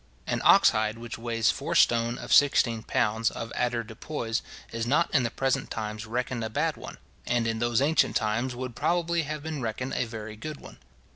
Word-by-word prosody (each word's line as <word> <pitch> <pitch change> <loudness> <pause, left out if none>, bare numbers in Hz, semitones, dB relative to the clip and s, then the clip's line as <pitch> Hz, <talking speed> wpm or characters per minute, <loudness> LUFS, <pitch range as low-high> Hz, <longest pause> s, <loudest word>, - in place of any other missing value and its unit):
An - - -1
ox - - +7
hide 110 +1 -1
which 120 0 -7
weighs 115 -1 +1
four - - -4
stone 120 +1 +3
of - - -2
sixteen 120 -5 +4
pounds 110 +2 +1
of 115 0 -6
avoirdupois, 115 0 -2 0.3
is 115 0 -3
not 150 +7 +2
in 145 - +4
the 120 - 0
present 135 +2 -1
times 110 0 -5
reckoned 120 +1 -2
a 110 - -3
bad 110 - 0
one; - - -9 0.3
and 120 -1 +1
in 115 -1 -1
those 120 +2 +2
ancient 155 +3 +2
times 120 +4 0
would 125 -1 -6
probably 170 +2 +1
have 150 -1 -5
been 160 -3 -4
reckoned 120 +3 -3
a - - 0
very 110 -2 -7
good 150 +7 -7
one. - - -13
120 Hz, 195 wpm, -27 LUFS, 115-130 Hz, 0.3 s, ox